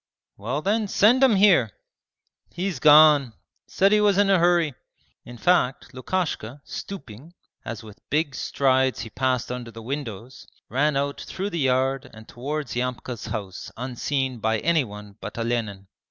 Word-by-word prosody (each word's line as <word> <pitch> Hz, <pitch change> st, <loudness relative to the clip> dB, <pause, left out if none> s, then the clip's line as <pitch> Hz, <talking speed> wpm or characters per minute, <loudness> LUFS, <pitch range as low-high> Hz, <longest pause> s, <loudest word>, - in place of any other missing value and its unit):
'Well 125 Hz, +9 st, -4 dB
then 215 Hz, +2 st, +1 dB
send 225 Hz, +6 st, +4 dB
him 255 Hz, -5 st, +5 dB
here!' 190 Hz, -, +5 dB, 0.8 s
'He's 180 Hz, -5 st, -3 dB
gone; 150 Hz, -3 st, +6 dB, 0.3 s
said 195 Hz, +1 st, +2 dB
he 210 Hz, 0 st, +4 dB
was 205 Hz, -2 st, +3 dB
in 200 Hz, -1 st, +4 dB
a 190 Hz, -, +4 dB
hurry.' 170 Hz, -3 st, +3 dB, 0.5 s
In 120 Hz, 0 st, -10 dB
fact, 135 Hz, -4 st, +1 dB
Lukashka, 135 Hz, -3 st, -3 dB
stooping, 165 Hz, -, -9 dB, 0.3 s
as 110 Hz, 0 st, -6 dB
with 110 Hz, -1 st, -13 dB
big 150 Hz, -1 st, 0 dB
strides 130 Hz, 0 st, +1 dB
he 115 Hz, -, -8 dB
passed 130 Hz, -2 st, -1 dB
under 125 Hz, -1 st, -5 dB
the 115 Hz, 0 st, -11 dB
windows, 125 Hz, -3 st, -6 dB, 0.2 s
ran 145 Hz, +2 st, +1 dB
out 140 Hz, 0 st, -2 dB
through 195 Hz, +2 st, -5 dB
the 170 Hz, -, -3 dB
yard 130 Hz, 0 st, 0 dB
and 110 Hz, 0 st, -13 dB
towards 140 Hz, +1 st, -5 dB
Yamka's 125 Hz, -2 st, -4 dB
house 100 Hz, -4 st, -6 dB
unseen 130 Hz, +1 st, -2 dB
by 110 Hz, +1 st, +1 dB
anyone 105 Hz, -9 st, -2 dB
but -, -, -7 dB
Olenin. 115 Hz, -4 st, -2 dB
130 Hz, 150 wpm, -24 LUFS, 120-170 Hz, 0.8 s, gone